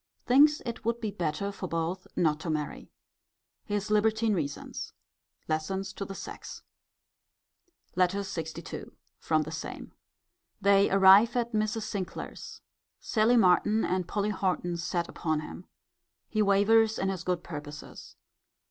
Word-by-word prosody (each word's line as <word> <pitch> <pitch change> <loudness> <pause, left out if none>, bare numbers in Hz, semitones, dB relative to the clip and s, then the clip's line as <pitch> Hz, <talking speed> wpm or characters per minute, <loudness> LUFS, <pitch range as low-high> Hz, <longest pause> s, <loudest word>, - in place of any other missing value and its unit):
Thinks 295 +4 +5
it 235 -2 -5
would 230 +1 0
be 215 -3 -3
better 175 +3 -2
for 195 -2 -6
both 165 +3 -3
not 155 -3 +2
to 165 0 -5
marry. 150 -2 -3 0.8
His 205 +1 -2
libertine 220 +1 +2
reasons. 145 -6 -4 0.5
Lessons 190 +5 -2
to 200 - -5
the 195 - -7
sex. - - -8 1.3
LETTER 185 +2 +2
LXII. 165 -5 -6 0.3
From 155 0 +1
the 155 - -7
same. 160 - -7 0.7
They 200 0 +4
arrive 195 +4 +7
at 240 -1 0
Mrs. 215 +1 0
Sinclair's. 200 -4 -6 0.4
Sally 230 +2 +2
Martin 210 +2 +4
and 185 -1 -1
Polly 205 +1 -1
Horton 185 -3 -1
set 170 0 -2
upon 155 -2 -2
him. 175 +3 -9 0.6
He 215 - 0
wavers 215 +2 +4
in 190 - 0
his 185 -3 -3
good 180 -2 -1
purposes. 150 -2 -9
195 Hz, 130 wpm, -29 LUFS, 170-215 Hz, 1.3 s, arrive